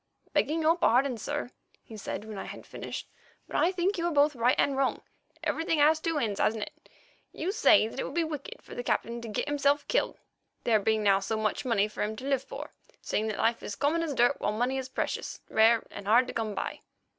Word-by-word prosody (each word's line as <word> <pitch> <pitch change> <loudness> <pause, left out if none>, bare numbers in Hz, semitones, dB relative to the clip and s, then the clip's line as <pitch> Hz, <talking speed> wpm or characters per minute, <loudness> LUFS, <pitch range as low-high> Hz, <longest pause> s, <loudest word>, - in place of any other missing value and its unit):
"Begging 320 +1 +1
your 320 +2 +5
pardon, 260 -3 +3
sir," 290 +1 -3 0.3
he 225 - -11
said, 210 0 -5
when 215 -2 -7
I - - -5
had - - -9
finished, - - -6 0.4
"but - - -9
I 345 - +3
think 370 +1 0
you 340 - +1
are - - 0
both 295 -1 +4
right 245 +1 +3
and 280 - +2
wrong. 270 -1 0 0.4
Everything 325 0 0
has 305 +2 +5
two 330 0 -1
ends, 215 -7 -1
hasn't 220 -1 +1
it? - - -12 0.4
You 350 +4 -2
say 320 - +5
that 230 - -7
it - - 0
would - - -6
be 340 - +2
wicked 305 -3 -6
for - - -11
the - - -4
Captain 235 0 -1
to 235 - -7
get 215 +6 -2
himself 285 0 +1
killed, - - 0 0.5
there 220 -2 +4
being 220 +1 +1
now 195 -1 +5
so 220 +3 -2
much 215 +5 -1
money 215 -4 +2
for 215 - -7
him 215 +1 -1
to 255 - -8
live 275 -2 +1
for, - - -8 0.3
seeing 215 - -1
that 215 - -3
life 230 +1 +1
is 205 - -5
common 300 +7 +1
as 310 -4 -2
dirt 245 +3 +3
while - - +1
money 250 +4 0
is 260 0 -6
precious, - - -3
rare 225 +1 +5
and 200 -1 -8
hard 235 +4 +6
to - - -7
come 220 -3 -2
by. - - -4
255 Hz, 235 wpm, -29 LUFS, 220-295 Hz, 0.5 s, hard